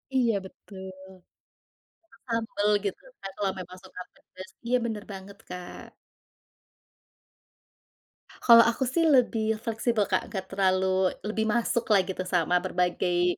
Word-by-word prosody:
Iya 240 -3 +3
betul. 190 0 -11 1.2
Suka - - -22
sambal 225 -3 -1 0.2
gitu 200 - -3 0.2
kan, 195 - -6
kalau 195 -2 0
memang 185 0 -9
suka 185 -1 -10
pedas. 185 +1 -13 0.2
Iya 250 +1 +3
benar 220 -3 -4
banget 195 +1 -10
Kak. 180 -1 -8 2.5
Kalau 230 -1 +9
aku 235 +3 -1
sih 330 +7 +1
lebih 235 -3 +2 0.2
fleksibel 225 -1 0
Kak, - - +1
enggak 190 -2 -4
terlalu 190 -1 +2 0.4
lebih 220 +1 -1
masuk 235 0 +1
lah 200 -2 +6
gitu, 185 0 -4
sama 180 -1 +1
berbagai 180 0 +1
200 Hz, 125 wpm, -27 LUFS, 185-230 Hz, 2.5 s, Kalau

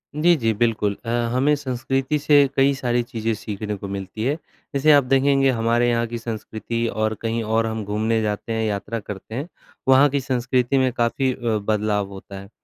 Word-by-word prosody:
जी, 170 +3 +4
जी, 115 -7 0
बिल्कुल 105 -2 0
अ, - - -4 0.2
हमें 135 +4 +3
संस्कृति 135 +1 -1
से 145 -1 +5
कई 135 +1 +4
सारी 120 -2 0
चीज़ें 115 -1 -2
सीखने 105 0 -5
को 100 0 -7
मिलती 100 +2 -5
हैं। 140 +3 +1 0.4
जैसे 140 +3 +4
आप 145 -1 +6
देखेंगे, 135 +1 +3
हमारे 120 0 +2
यहाँ 115 0 +1
की 120 +1 -5
संस्कृति 115 0 -4
और 110 -1 -1
कहीं 115 0 -1
और 110 +1 +1
हम 110 -1 -3
घूमने 110 +2 0
जाते 105 +1 -3
हैं, 110 0 -1
यात्रा 105 +2 -3
करते 105 +1 -8
हैं, 140 +6 -3 0.4
वहाँ 135 +2 +6
की 140 +1 0
संस्कृति 125 0 0
में 130 -1 +2
काफ़ी 130 +2 +1
अ, - - -11 0.3
बदलाव 105 -2 0
होता 95 0 -9
है। 100 0 -12
115 Hz, 190 wpm, -22 LUFS, 110-135 Hz, 0.4 s, आप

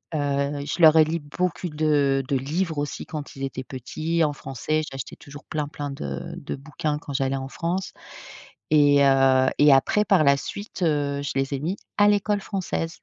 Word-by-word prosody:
Heu, 140 0 -1
je 170 - -3
leur 160 -1 +8
ai 160 - +8
lu 160 +2 -2
beaucoup 180 +5 -3
de 150 -3 +1
de 135 - -1
livres 160 +4 -2
aussi 145 0 -3
quand 150 -2 -7
ils 135 - -7
étaient 130 -1 -4
petits, 155 +6 -2
en 150 - +2
français. 145 +3 -3
J'achetais 135 -2 -7
toujours 145 0 -12
plein, 150 -2 -3
plein 145 -1 -6
de 70 - -6
de - - -5
bouquins 150 +1 -3
quand 145 - -9
j'allais 135 -1 0
en 135 0 -5
France 180 +4 -3 0.8
et 145 -2 +5
heu 135 -1 +4
et 145 -1 +6
après 135 +10 +4
par 195 -7 +3
la 140 0 +6
suite, 200 +7 -7
heu, 145 -3 0
je 140 - -3
les 135 +1 -1
ai 135 - -3
mis 180 +7 -2 0.2
à 205 0 +6
l'école 205 0 +1
française. 185 -5 -3
145 Hz, 195 wpm, -24 LUFS, 135-160 Hz, 0.8 s, leur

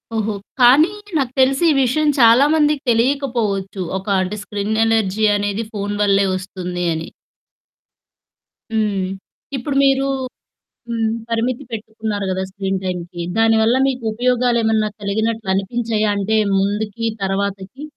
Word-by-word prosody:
ఓహో! 215 -1 -1 0.3
కానీ 285 +9 +6 0.3
నాకు 260 -3 -1
తెలిసి 270 +5 +3
ఈ - - +5
విషయం 300 +4 +1
చాలామందికి 290 +5 +5
తెలియకపోవచ్చు. 230 -6 0 0.2
ఒక 190 - -8 0.2
అంటే 185 +3 -3
స్క్రిన్ 205 +1 -3
ఎలర్జీ 220 -2 +1
అనేది 205 +2 -2
ఫోను 205 0 -3
వల్లే 200 -1 +3
వస్తుంది 180 -1 -5
అని. 160 0 -5 1.7
హ్మ్. 205 -4 0 0.5
ఇప్పుడు 270 +2 -3
మీరు 270 0 +3 0.8
హ్మ్. 225 -1 -1 0.2
పరిమితి 235 +3 -1
పెట్టుకున్నారు 220 -2 -4
గదా! 190 0 -2
స్క్రీన్ 195 -1 -2
టైమ్‌కి. 175 -1 -4 0.2
దానివల్ల 225 +1 +4
మీకుపయోగలేమన్నా 235 -2 +1
కలిగినట్లనిపించాయా? 215 +1 -1
అంటే 215 +2 +1 0.2
ముందుకి 210 +3 -2 0.2
తర్వాతకి? 195 +6 -3
220 Hz, 105 wpm, -19 LUFS, 200-240 Hz, 1.7 s, కానీ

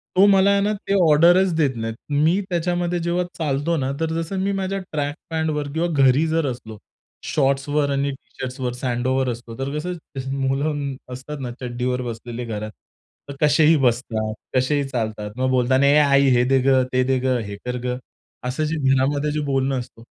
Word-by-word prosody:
तो 190 - +7
मला 195 0 +5
आहे 200 0 +3
ना, 210 +1 +1
ते 200 -1 -3
ऑर्डरच 170 +5 +5
देत 145 -5 +1
नाही. 115 0 -3 0.3
मी 175 +5 +3
त्याच्यामध्ये 175 0 0
जेव्हा 175 +1 0
चालतो 150 +1 0
ना, 135 -1 -1
तर 160 0 -1
जसं 190 +4 -4
मी 200 - 0
माझ्या 195 +1 -2
ट्रॅक 145 -1 -2
पॅंटवर 155 -2 -1
किंवा 165 +2 0 0.2
घरी 135 +4 +4
जर 160 -1 +1
असलो 110 -3 -9 0.5
शॉर्ट्सवर 140 +1 +1
आणि 140 0 0
टी-शर्ट्सवर 130 -1 -6
स्लेडवेअर 130 +1 -1
असतो. 115 -1 -7
तर 135 - -2
कसं 180 +3 -4 0.4
मुलं 140 +1 -1 0.2
असतात 140 +3 -7
ना 125 -2 -4
चड्डीवर 125 0 -2
बसलेले 120 0 -6
घरात. 110 -1 -5 0.6
तर 140 - -6
कसेही 150 +2 +5
बसतात, 115 -4 0 0.2
कसेही 140 +3 +2
चालतात. 110 -4 -3
मग 130 0 +1
बोलता 130 0 +2
ना, 140 - +3
"ए 140 +1 +5
आई, 140 -1 +4
हे 120 - +4
दे 135 - +5
गं, 130 -1 +4
ते 130 - +3
दे 130 0 +1
गं, 130 -1 +1
हे 100 - -6
कर 125 0 -2
गं," 125 0 -2 0.5
असं 130 +5 -2
जे 155 - -1 0.2
घरामध्ये 140 +3 +1
जे 150 - -1
बोलणं 135 -1 0
असत. 120 -2 -10
135 Hz, 180 wpm, -22 LUFS, 125-155 Hz, 0.6 s, तो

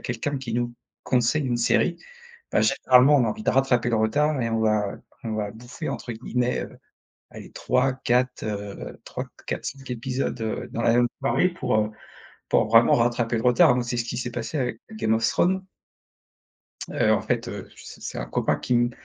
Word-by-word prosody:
quelqu'un 130 +4 -2
qui 120 -4 -5
nous 120 0 -1 0.3
conseille 125 +4 +1
une 120 -2 0
série, 170 +8 +2 0.6
bah, - - +3
généralement 130 +3 +5
on 130 - +4
a - - +1
envie 215 0 -4
de - - +2
rattraper 125 -2 +2
le 115 - +2
retard 140 +6 +1
et 115 - 0
on 115 - 0
va 110 -2 +1 0.3
on 110 -1 -2
va 105 -1 -2
«bouffer», 120 +8 -7
entre 120 -2 -4
guillemets, 125 +2 -1
heu, - - -10 0.5
allez - - -11
3-4, 130 -1 0
heu, 100 -2 -5
3-4-5 135 -1 -6
épisodes, 125 +2 -2
heu, 110 -1 -3
dans 115 - -3
la 115 - +3
même 120 0 +4
soirée 140 +6 +2
pour, 130 -9 -2
heu, 105 0 +1 0.6
pour - - +3
vraiment 115 +1 +6
rattraper 120 0 +1
le 110 - -3
retard. 125 +2 +5
Moi, 125 - 0
c'est 120 0 -3
ce 115 - 0
qui 120 0 -4
s'est 125 0 -3
passé 115 +6 -4
avec 125 -3 -2 0.2
Game 110 0 +1
of 115 0 +2
Thrones 190 +2 +1 1.3
heu, - - +2
en - - +2
fait, - - -1
heu, - - -7
c - - -11
c'est - - -5
un - - -4
copain - - 0
qui 125 - -1
m 120 0 +3
120 Hz, 190 wpm, -25 LUFS, 115-130 Hz, 1.3 s, vraiment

